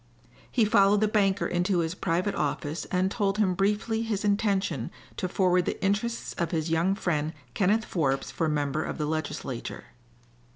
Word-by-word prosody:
He 235 Hz, -4 st, +3 dB
followed 200 Hz, 0 st, +5 dB
the 215 Hz, -, +3 dB
banker 200 Hz, -2 st, +2 dB
into 180 Hz, +2 st, +1 dB
his 165 Hz, -1 st, 0 dB
private 180 Hz, +2 st, 0 dB
office 150 Hz, +2 st, -2 dB
and 185 Hz, +1 st, 0 dB
told 200 Hz, -2 st, 0 dB
him 200 Hz, -4 st, +3 dB
briefly 210 Hz, +4 st, 0 dB
his 215 Hz, -3 st, -2 dB
intention 200 Hz, -, +1 dB, 0.3 s
to 185 Hz, -, -1 dB
forward 180 Hz, -1 st, +2 dB
the -, -, -2 dB
interests 230 Hz, +4 st, -1 dB
of 170 Hz, -3 st, 0 dB
his 160 Hz, -1 st, -1 dB
young 170 Hz, +4 st, +2 dB
friend 160 Hz, -6 st, -1 dB, 0.2 s
Kenneth 215 Hz, +3 st, +2 dB
Forbes 135 Hz, -5 st, -1 dB
for 155 Hz, +3 st, 0 dB
Member 145 Hz, 0 st, 0 dB
of -, -, -4 dB
the 150 Hz, -, -1 dB
Legislature. 150 Hz, -5 st, -4 dB
185 Hz, 165 wpm, -27 LUFS, 160-205 Hz, 0.3 s, followed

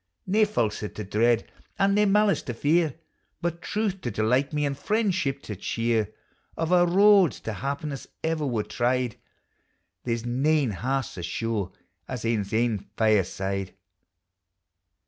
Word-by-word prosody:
Nae 210 Hz, +3 st, +3 dB
falsehood 110 Hz, -, -2 dB
to 105 Hz, -, -4 dB
dread, 115 Hz, +4 st, +2 dB, 0.3 s
and 200 Hz, 0 st, +3 dB
nae 210 Hz, +1 st, +4 dB
malice 205 Hz, 0 st, +3 dB
to 120 Hz, -, -5 dB
fear, 155 Hz, +3 st, +2 dB, 0.4 s
But 170 Hz, 0 st, -3 dB
truth 210 Hz, -3 st, -2 dB
to 120 Hz, -, -2 dB
delight 120 Hz, +7 st, +1 dB
me, 150 Hz, -1 st, 0 dB
aud 140 Hz, -, -2 dB
friendship 190 Hz, -8 st, 0 dB
to 105 Hz, -, -6 dB
cheer; 115 Hz, +1 st, -1 dB, 0.5 s
Of 165 Hz, +1 st, -1 dB
a' 175 Hz, -1 st, +5 dB
roads 195 Hz, -, +5 dB
to 110 Hz, -, -4 dB
happiness 140 Hz, +3 st, -4 dB, 0.2 s
ever 160 Hz, -2 st, 0 dB
were 115 Hz, -5 st, 0 dB
tried, 125 Hz, 0 st, 0 dB, 0.9 s
There 115 Hz, -1 st, 0 dB
's 115 Hz, -, -8 dB
nane 135 Hz, +2 st, +2 dB
half 130 Hz, +8 st, -1 dB
so 90 Hz, -, -8 dB
sure 100 Hz, +2 st, -2 dB, 0.4 s
as 125 Hz, -3 st, -5 dB
ane's 110 Hz, -4 st, 0 dB
ain 115 Hz, -1 st, +1 dB, 0.2 s
fireside. 100 Hz, -2 st, 0 dB
130 Hz, 145 wpm, -26 LUFS, 110-170 Hz, 0.9 s, a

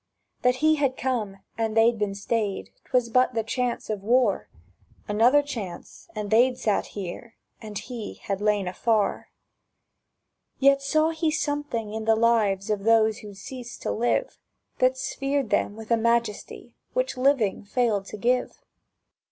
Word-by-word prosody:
That 250 Hz, 0 st, +3 dB
he 315 Hz, 0 st, +5 dB
had 275 Hz, -3 st, 0 dB
come 225 Hz, -7 st, -2 dB, 0.2 s
and 225 Hz, -1 st, -1 dB
they'd 225 Hz, 0 st, +4 dB
been 205 Hz, -1 st, -1 dB
stayed, 200 Hz, -, -2 dB
'Twas 250 Hz, -2 st, +1 dB
but 255 Hz, +1 st, +3 dB
the 225 Hz, -, +1 dB
chance 245 Hz, +2 st, -2 dB
of 210 Hz, -3 st, -3 dB
war: 215 Hz, -, +2 dB, 0.6 s
Another 240 Hz, +8 st, +4 dB
chance, 210 Hz, -12 st, -7 dB
and 210 Hz, -1 st, -4 dB
they'd 250 Hz, +3 st, +4 dB
sat 210 Hz, -2 st, 0 dB
here, 200 Hz, +4 st, -6 dB, 0.3 s
And 215 Hz, -2 st, -7 dB
he 235 Hz, -3 st, -6 dB
had 195 Hz, 0 st, -4 dB
lain 210 Hz, -2 st, +1 dB
afar. 215 Hz, +3 st, 0 dB, 1.3 s
Yet 275 Hz, 0 st, +4 dB
saw 310 Hz, +3 st, +2 dB
he 320 Hz, 0 st, 0 dB
something 290 Hz, -8 st, -2 dB
in 220 Hz, 0 st, -4 dB
the 225 Hz, 0 st, +4 dB
lives 215 Hz, -4 st, +2 dB
Of 205 Hz, -2 st, -1 dB
those 220 Hz, -1 st, +3 dB
who'd 205 Hz, -2 st, -11 dB
ceased 245 Hz, +2 st, -9 dB
to -, -, -1 dB
live 240 Hz, -, 0 dB, 0.4 s
That 255 Hz, +1 st, +3 dB
sphered 275 Hz, -1 st, -2 dB
them 205 Hz, -, +1 dB
with 220 Hz, +1 st, -10 dB
a 230 Hz, -, +5 dB
majesty 235 Hz, -2 st, -1 dB, 0.2 s
Which -, -, 0 dB
living 255 Hz, -7 st, +2 dB
failed 210 Hz, -2 st, 0 dB
to -, -, -7 dB
give. 250 Hz, +4 st, 0 dB
230 Hz, 150 wpm, -25 LUFS, 210-255 Hz, 1.3 s, he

